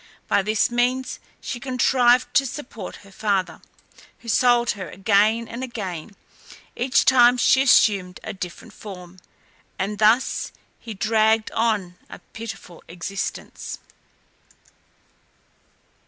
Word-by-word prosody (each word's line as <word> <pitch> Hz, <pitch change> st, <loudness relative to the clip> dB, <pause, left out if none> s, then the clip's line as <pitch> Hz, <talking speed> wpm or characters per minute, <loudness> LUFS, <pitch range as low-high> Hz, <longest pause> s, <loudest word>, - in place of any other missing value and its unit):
By -, -, +2 dB
this 215 Hz, +3 st, +1 dB
means 250 Hz, +2 st, 0 dB, 0.2 s
she 240 Hz, -, -5 dB
contrived 250 Hz, -1 st, +2 dB
to 275 Hz, -1 st, +3 dB
support 240 Hz, -7 st, -8 dB
her 200 Hz, -, -16 dB
father, 195 Hz, -2 st, -1 dB, 0.6 s
who 235 Hz, -, -9 dB
sold 240 Hz, +1 st, +3 dB
her 190 Hz, -5 st, -7 dB
again 215 Hz, +4 st, +2 dB
and 235 Hz, +3 st, -6 dB
again 200 Hz, -6 st, -6 dB, 0.6 s
each 255 Hz, +2 st, +2 dB
time 250 Hz, -1 st, +6 dB
she 260 Hz, +2 st, +4 dB
assumed 200 Hz, -8 st, +3 dB
a -, -, -5 dB
different 190 Hz, +3 st, -8 dB
form, 185 Hz, -4 st, -11 dB, 0.6 s
and 200 Hz, +2 st, -3 dB
thus 220 Hz, +4 st, +2 dB, 0.3 s
he 225 Hz, -2 st, -8 dB
dragged 220 Hz, +2 st, +2 dB
on 210 Hz, -6 st, -1 dB
a -, -, -9 dB
pitiful 220 Hz, -6 st, -10 dB
existence. 180 Hz, +3 st, -6 dB
220 Hz, 110 wpm, -23 LUFS, 195-245 Hz, 0.6 s, time